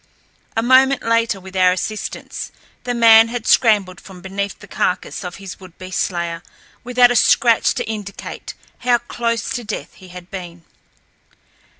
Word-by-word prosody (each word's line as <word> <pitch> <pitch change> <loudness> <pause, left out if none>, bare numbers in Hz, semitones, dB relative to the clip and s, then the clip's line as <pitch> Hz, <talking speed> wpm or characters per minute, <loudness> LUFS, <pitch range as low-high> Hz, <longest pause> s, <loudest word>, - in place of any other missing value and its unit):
A 225 - +2
moment 260 +2 +4
later, 230 -2 +1
with 190 0 -12
our 185 -1 +4
assistance, 210 +3 -5 0.3
the 245 0 -2
man 225 -1 +7
had 235 -1 -5
scrambled 205 -6 +3
from 190 -2 -13
beneath 195 +2 -4
the - - -14
carcass 180 - -2
of 180 -1 -6
his 195 -2 -9
would 185 -2 -14
be 185 0 -9
slayer, 170 -2 -2 0.4
without 245 0 +4
a - - 0
scratch 235 0 +4
to - - -3
indicate 210 -2 -7 0.2
how 245 -1 +3
close 235 -2 -3
to 245 - -3
death 215 -1 -6
he 185 - -15
had 180 0 -12
been. 175 -3 -8
205 Hz, 160 wpm, -19 LUFS, 185-235 Hz, 0.4 s, man